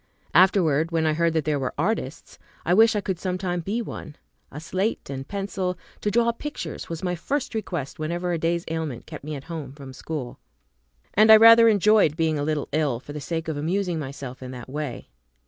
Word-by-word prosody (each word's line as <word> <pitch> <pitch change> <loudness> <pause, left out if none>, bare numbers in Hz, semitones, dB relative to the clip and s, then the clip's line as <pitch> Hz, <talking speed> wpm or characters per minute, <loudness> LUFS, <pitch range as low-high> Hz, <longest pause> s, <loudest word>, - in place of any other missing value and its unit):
Afterward, 165 -4 +4
when 165 -1 0
I 155 - +2
heard 165 +1 +1
that 160 -2 0
there 150 -2 0
were 130 -2 -3
artists, 165 -4 -3 0.3
I 175 - +3
wished 225 +3 +6
I 210 - +1
could 190 -3 -3
some 185 -1 -2
time 180 -2 -2
be 215 +8 -2
one. 150 -7 -8 0.4
A 145 - -7
slate 185 +1 -2
and 135 0 -6
pencil, 195 -2 -3 0.2
to 210 - -1
draw 235 +2 +3
pictures, 295 +5 -6
was 165 0 -5
my 180 -1 0
first 270 - -2
request 175 -12 -4
whenever 175 +3 -2
a 165 - -1
day's 170 +1 0
ailment 160 -6 -4
kept - - -9
me 150 +1 -5
at 135 - -7
home 155 -5 -7
from 140 -2 -10
school; 135 -2 -6 0.7
and 215 +2 +6
I - - +12
rather 230 +1 +8
enjoyed 210 -6 +4
being 160 -2 +1
a - - -1
little 150 -1 -1
ill, 145 -5 0
for 145 +3 -10
the 150 - -6
sake 165 +2 -3
of 160 -2 -2
amusing 175 +2 -1
myself 135 -3 -7
in 130 - -7
that 125 0 -9
way. 145 - -5
165 Hz, 210 wpm, -24 LUFS, 145-195 Hz, 0.7 s, I